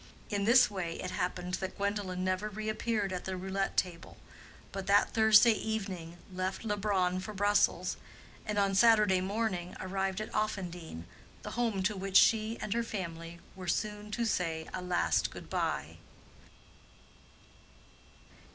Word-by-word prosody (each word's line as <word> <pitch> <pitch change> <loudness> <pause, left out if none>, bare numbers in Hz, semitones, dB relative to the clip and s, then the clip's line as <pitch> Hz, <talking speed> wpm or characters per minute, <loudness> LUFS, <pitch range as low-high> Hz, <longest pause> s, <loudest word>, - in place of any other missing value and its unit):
In 200 -1 0
this 245 +2 +7
way 180 -4 -3
it - - -4
happened 180 0 -3
that 190 -1 -5
Gwendolen 200 -2 -2
never 185 +3 -1
reappeared 215 -1 -2
at 180 - -4
the 190 -1 -3
roulette 195 +1 -2
table, 175 -2 -2 0.5
but 195 -1 -5
that 200 +1 +4
Thursday 220 +1 +7
evening 195 -6 -4 0.2
left 185 +4 -3
Leubronn 200 -4 +1
for 210 +3 -7
Brussels, 205 +1 +2 0.5
and 210 -1 -3
on 200 -1 +2
Saturday 210 -3 +5
morning 190 -3 -2
arrived 190 +1 -2
at 215 - -6
Offendene, 180 - -3 0.4
the - - -6
home 225 -5 0
to 205 +2 +1
which 195 0 +2
she 220 0 +4
and 210 - -2
her 235 - +1
family 170 -6 -6 0.2
were 185 -1 -8
soon 210 +3 -2
to 230 +3 -1
say 165 -6 -1
a 185 - -3
last 85 - +1
good - - -11
bye. - - -2
195 Hz, 140 wpm, -31 LUFS, 185-215 Hz, 0.5 s, this